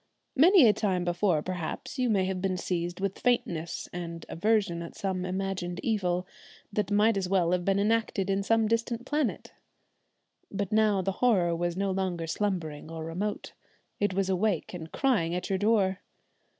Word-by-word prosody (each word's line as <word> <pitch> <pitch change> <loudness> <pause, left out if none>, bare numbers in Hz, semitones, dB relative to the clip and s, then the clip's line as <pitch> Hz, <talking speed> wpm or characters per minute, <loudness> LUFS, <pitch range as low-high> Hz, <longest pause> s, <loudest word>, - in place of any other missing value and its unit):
Many 325 - +7
a 210 - +6
time 185 -5 0
before, 175 -2 +1
perhaps, 180 - -5
you 250 -1 +2
may 195 -4 +2
have 185 -1 -2
been 190 -1 0
seized 175 0 -3
with 195 0 -2
faintness 170 -9 -1
and 170 -1 -6
aversion 200 -2 +1
at 170 - -8
some 185 -2 -2
imagined 185 -1 -3
evil, 180 -5 0 0.5
that 205 -1 0
might 210 +1 +3
as 185 -2 -2
well 180 -3 +2
have 180 -1 +1
been 195 +1 +2
enacted 210 -2 +1
in 195 0 +1
some 225 +2 +2
distant 230 +2 -1
planet. 295 -2 -1 1.0
But 200 -1 -3
now 215 -3 +3
the 195 - 0
horror 185 -9 +3
was 175 +1 -2
no 195 0 0
longer 185 -3 -2
slumbering 165 -5 -3
or 165 -1 -6
remote; 190 +6 -4 0.5
it 205 -2 0
was 195 -1 +1
awake 190 -2 0
and 165 -2 -7
crying 195 -12 +1
at 180 - -3
your 190 - +1
door. 200 -3 +2
190 Hz, 170 wpm, -28 LUFS, 175-210 Hz, 1.0 s, Many